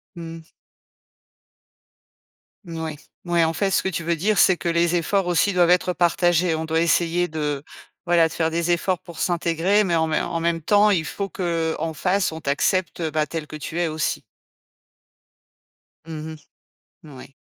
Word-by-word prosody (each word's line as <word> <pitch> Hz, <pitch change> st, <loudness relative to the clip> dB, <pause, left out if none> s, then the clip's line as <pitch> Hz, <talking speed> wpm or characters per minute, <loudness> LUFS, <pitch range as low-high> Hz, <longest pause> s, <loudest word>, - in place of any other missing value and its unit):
Mmh. 165 Hz, -1 st, -8 dB, 2.2 s
Mouais. 160 Hz, -2 st, -5 dB, 0.3 s
Mouais, 175 Hz, -1 st, +2 dB
en 160 Hz, 0 st, +1 dB
fait, 195 Hz, +2 st, 0 dB
ce -, -, +2 dB
que 190 Hz, -, -2 dB
tu 170 Hz, -1 st, -4 dB
veux 170 Hz, +1 st, 0 dB
dire, 200 Hz, +5 st, 0 dB
c'est 185 Hz, -, +5 dB
que 170 Hz, -, -3 dB
les 170 Hz, +1 st, +2 dB
efforts 190 Hz, +3 st, +1 dB
aussi 180 Hz, +3 st, +2 dB
doivent 175 Hz, -1 st, +4 dB
être 180 Hz, 0 st, +2 dB
partagés. 175 Hz, -1 st, +2 dB
On 160 Hz, 0 st, -2 dB
doit 160 Hz, 0 st, 0 dB
essayer 170 Hz, +1 st, +2 dB
de 150 Hz, -3 st, -3 dB, 0.4 s
voilà, 170 Hz, -2 st, +4 dB
de 160 Hz, -, -10 dB
faire 160 Hz, -1 st, 0 dB
des 170 Hz, +1 st, 0 dB
efforts 175 Hz, +1 st, 0 dB
pour 170 Hz, -3 st, -12 dB
s'intégrer, 175 Hz, +4 st, +1 dB
mais 175 Hz, -4 st, 0 dB
en 160 Hz, 0 st, +2 dB
mais 155 Hz, -, 0 dB
en 165 Hz, -, -3 dB
même 165 Hz, 0 st, -1 dB
temps, 205 Hz, +5 st, +4 dB
il 165 Hz, -5 st, +1 dB
faut 195 Hz, +8 st, -4 dB
qu'en 165 Hz, -5 st, -2 dB
face, 185 Hz, +3 st, 0 dB
on 160 Hz, -, -7 dB
t'accepte, 170 Hz, +6 st, 0 dB
heu, 160 Hz, -2 st, -2 dB
bah, 155 Hz, 0 st, +1 dB
tel 160 Hz, -2 st, -5 dB
que 155 Hz, -, -9 dB
tu 155 Hz, +3 st, -5 dB
es 175 Hz, -, +1 dB
aussi. 155 Hz, 0 st, -2 dB, 1.9 s
Mmh 160 Hz, 0 st, -6 dB
mh. -, -, -9 dB, 0.7 s
Mouais. 140 Hz, -4 st, -12 dB
170 Hz, 175 wpm, -22 LUFS, 160-175 Hz, 2.2 s, c'est